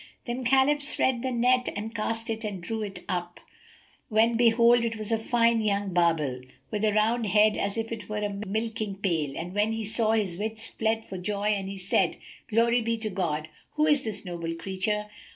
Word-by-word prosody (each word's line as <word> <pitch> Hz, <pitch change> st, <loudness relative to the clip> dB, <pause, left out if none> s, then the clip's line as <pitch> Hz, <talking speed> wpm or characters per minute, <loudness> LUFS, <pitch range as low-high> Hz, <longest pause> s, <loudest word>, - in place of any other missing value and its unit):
Then 245 Hz, +1 st, -3 dB
Khalif 270 Hz, +4 st, +3 dB
spread 260 Hz, -4 st, +1 dB
the 260 Hz, -, -1 dB
net 250 Hz, +1 st, +2 dB
and 215 Hz, +2 st, -5 dB
cast 225 Hz, +1 st, -2 dB
it 225 Hz, 0 st, -4 dB
and 205 Hz, -3 st, -4 dB
drew 220 Hz, +6 st, -4 dB
it 195 Hz, -3 st, -6 dB
up, 175 Hz, -2 st, -3 dB, 0.7 s
when 225 Hz, +2 st, +3 dB
behold, 235 Hz, +1 st, +5 dB
in 235 Hz, -, -1 dB
it 225 Hz, -1 st, -2 dB
was 215 Hz, 0 st, -3 dB
a 225 Hz, -, +2 dB
fine 230 Hz, 0 st, +2 dB
young 200 Hz, -3 st, 0 dB
barbel[FN#271] 150 Hz, -7 st, +1 dB, 0.2 s
with 215 Hz, 0 st, 0 dB
a 210 Hz, -, +2 dB
round 220 Hz, +2 st, +2 dB
head, 210 Hz, +2 st, +4 dB
as 200 Hz, +2 st, -2 dB
it 225 Hz, -3 st, -4 dB
were 210 Hz, -, -3 dB
a 205 Hz, -1 st, -2 dB
milking 220 Hz, 0 st, -2 dB
pail, 165 Hz, -8 st, -1 dB
which 175 Hz, +2 st, -5 dB
when 210 Hz, +2 st, +1 dB
he 225 Hz, -1 st, -3 dB
saw, 220 Hz, +1 st, +2 dB
his 200 Hz, -6 st, 0 dB
wits 220 Hz, +1 st, -3 dB
fled 220 Hz, 0 st, -1 dB
for 190 Hz, -, -7 dB
joy 205 Hz, +3 st, -1 dB
and 195 Hz, -2 st, -1 dB
he 195 Hz, -, -6 dB
said, 185 Hz, 0 st, +1 dB, 0.3 s
"Glory 235 Hz, +2 st, +3 dB
be 230 Hz, 0 st, -1 dB
to 220 Hz, -1 st, -4 dB
God! 160 Hz, -5 st, -2 dB, 0.3 s
What 305 Hz, 0 st, +3 dB
is 290 Hz, -2 st, +3 dB
this 210 Hz, -5 st, -5 dB
noble 170 Hz, -2 st, -4 dB
creature? 195 Hz, +4 st, -2 dB
215 Hz, 205 wpm, -27 LUFS, 195-230 Hz, 0.7 s, behold